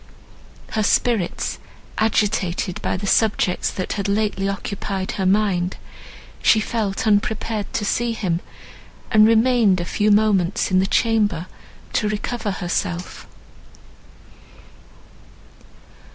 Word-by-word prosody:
Her 220 - 0
spirits 215 -3 0 0.4
agitated 200 -5 0
by - - -1
the 200 - -5
subjects 200 -3 +1
that 185 - -4
had 200 -2 -3
lately 200 -1 0
occupied 195 -1 -4
her 190 -2 -1
mind, 190 -3 +1 0.6
she 220 - +5
felt 215 -2 -2
unprepared 215 0 0
to 210 - -1
see 235 +3 0
him, 180 -6 -1 0.7
and 215 0 +6
remained 225 -4 +4
a 175 - -3
few 210 +4 0
moments 205 -4 +2
in 185 - +4
the 190 - +1
chamber 210 -8 +1 0.5
to 210 - +1
recover 215 +1 -3
herself. 180 -1 -3
205 Hz, 110 wpm, -21 LUFS, 185-220 Hz, 0.7 s, and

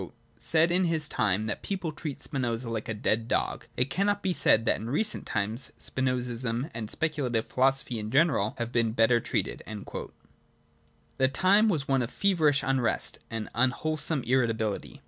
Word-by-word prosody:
xvi), 95 - -8 0.2
' - - -36
said 165 +1 +4
in 180 +1 +3
his 160 -3 0
time 105 -5 0
that 110 - -3
people 190 -5 -3
treat 150 -2 -6
Spinoza 120 -4 -2
like 110 -1 -4
a - - 0
dead 110 +1 0
dog - - -1
\ - - -32
It 125 +2 +1
cannot 200 +2 0
be 190 -1 +1
said 115 -8 +4
that - - +3
in 110 - -6
recent 210 - -1
times 110 +5 -1
Spinozism 125 +1 -2
and 110 -2 -5
speculative 140 -8 0
philosophy 130 -2 +1
in 105 0 -5
general 135 -4 +2
have 120 0 -3
been 115 -2 +1
better 115 +1 +4
treated.' - - -2 1.6
The 130 - +5
time 195 +10 +4
was 150 -8 -1
one 135 -1 +2
of 120 - -2
feverish 160 -8 +2
unrest 130 -3 0
and 115 -1 -4
unwhole 130 +6 +1
some 150 -5 -1
irritability. 115 -4 0
130 Hz, 175 wpm, -28 LUFS, 115-155 Hz, 1.6 s, The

